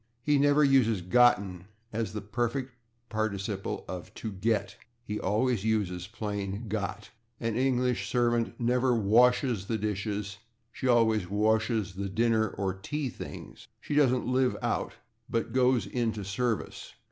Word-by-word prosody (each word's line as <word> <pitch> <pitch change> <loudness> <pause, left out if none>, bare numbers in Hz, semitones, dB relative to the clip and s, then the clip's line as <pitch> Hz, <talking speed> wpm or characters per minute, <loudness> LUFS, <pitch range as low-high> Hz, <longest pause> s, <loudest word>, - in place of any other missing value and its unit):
He 145 0 +3
never 145 +1 +4
uses 120 -9 +3
/gotten/ 95 -4 +3 0.3
as 110 -2 -2
the 105 -1 -5
perfect 120 +5 -2 0.4
participle 105 -2 -3
of 90 -2 -7
/get/; 105 -1 -1 0.3
he 105 -3 -4
always 110 +2 +1
uses 95 -5 -1
plain 105 0 -4
/got/. 105 0 -4 0.3
An 115 -2 -2
English 125 -1 +1
servant 120 -2 +1
never 125 +1 +2
washes 120 0 +3
the 110 - 0
/dishes/; 105 -1 -3 0.3
she 130 - -4
always 110 -6 +3
washes 110 -1 +1
the 100 +1 -4
/dinner/ 110 +1 +2
or 95 -2 -1
/tea 135 +8 -4
things/. - - -9
She - - -5
doesn't 130 -4 +3
/live 130 0 +2
out/, - - -1 0.4
but 115 - -1
/goes 125 -5 +3
into 110 -4 -2
service 110 +3 -3
110 Hz, 135 wpm, -29 LUFS, 100-125 Hz, 0.4 s, never